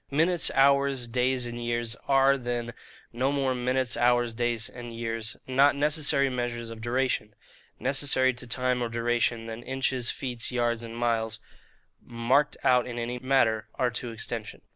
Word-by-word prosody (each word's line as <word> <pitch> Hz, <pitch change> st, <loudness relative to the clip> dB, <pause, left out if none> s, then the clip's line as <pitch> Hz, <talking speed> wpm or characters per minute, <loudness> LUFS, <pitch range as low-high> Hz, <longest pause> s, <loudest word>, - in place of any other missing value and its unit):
Minutes, 165 Hz, +3 st, +2 dB
hours, 140 Hz, -1 st, +3 dB
days, 125 Hz, +1 st, 0 dB
and 120 Hz, 0 st, -6 dB
years 120 Hz, -1 st, -1 dB
are, 135 Hz, 0 st, +5 dB
then, 120 Hz, -2 st, -3 dB, 0.4 s
no 130 Hz, +4 st, 0 dB
more 135 Hz, -2 st, 0 dB
Minutes, 125 Hz, 0 st, 0 dB
Hours, 120 Hz, 0 st, +2 dB
Days, 120 Hz, -2 st, -1 dB
and 120 Hz, -1 st, -9 dB
Years 115 Hz, -1 st, -3 dB
not 135 Hz, +3 st, +4 dB
necessary 145 Hz, -1 st, +2 dB
Measures 120 Hz, -2 st, -3 dB
of 110 Hz, -1 st, -9 dB
duration, 120 Hz, -3 st, -1 dB, 0.4 s
necessary 130 Hz, 0 st, +3 dB
to 125 Hz, 0 st, -4 dB
time 125 Hz, +1 st, 0 dB
or 120 Hz, -, -1 dB
duration, 115 Hz, 0 st, 0 dB
than 115 Hz, +1 st, -7 dB
inches, 130 Hz, -1 st, -1 dB
feet, 125 Hz, -4 st, -3 dB
yards, 120 Hz, -2 st, 0 dB
and 115 Hz, 0 st, -7 dB
miles, 115 Hz, -2 st, 0 dB, 0.6 s
marked 125 Hz, +5 st, +1 dB
out 125 Hz, -1 st, +3 dB
in 120 Hz, -1 st, -6 dB
any 120 Hz, +1 st, -3 dB
matter, 120 Hz, -4 st, +2 dB
are 125 Hz, -1 st, 0 dB
to 120 Hz, +1 st, -4 dB
extension. 115 Hz, -1 st, -6 dB
120 Hz, 155 wpm, -27 LUFS, 115-130 Hz, 0.6 s, are